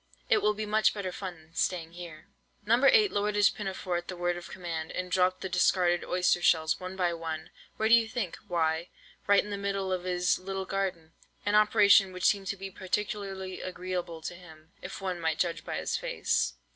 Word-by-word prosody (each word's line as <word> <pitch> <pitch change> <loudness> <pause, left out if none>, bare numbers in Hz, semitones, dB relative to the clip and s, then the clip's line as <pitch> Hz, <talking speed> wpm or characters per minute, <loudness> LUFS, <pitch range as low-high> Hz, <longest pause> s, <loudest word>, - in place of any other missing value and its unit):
It - - +6
will 210 0 +2
be 215 +1 -3
much 215 +1 +2
better 195 -3 -3
fun 185 -1 -6
than 160 0 -21
staying 165 -3 -1
here." 170 0 -10 0.4
No. 235 +5 +3
8 415 +8 +6
lowered 205 +1 0
his 205 -1 +5
pinafore 190 -3 -3
at 175 - -6
the 185 - -6
word 175 0 0
of 175 +1 -8
command, 165 -3 -5
and 180 0 -4
dropped 185 0 +2
the - - -3
discarded 175 -1 +2
oyster 180 -1 +1
shells, 160 -2 +3
one 185 0 -6
by 180 -2 +1
one—where 165 +6 -5
do 225 - +5
you 230 -1 +6
think?—why—right 175 -2 -1
into 210 - -8
the 200 - -2
middle 195 -1 -1
of 180 -1 -3
his 180 0 +1
little 190 +1 -4
garden! 185 -4 -3 0.3
an 205 - +1
operation 210 -2 +5
which 180 0 -3
seemed 195 -2 +2
to 200 - -2
be 195 0 -7
particularly 190 -1 -3
agreeable 180 -3 -5
to - - -4
him, 160 -2 -15
if - - -7
one 185 -2 -3
might 160 -1 0
judge 175 -2 -1
by - - -4
his - - -2
face. - - 0
185 Hz, 195 wpm, -29 LUFS, 175-200 Hz, 0.4 s, It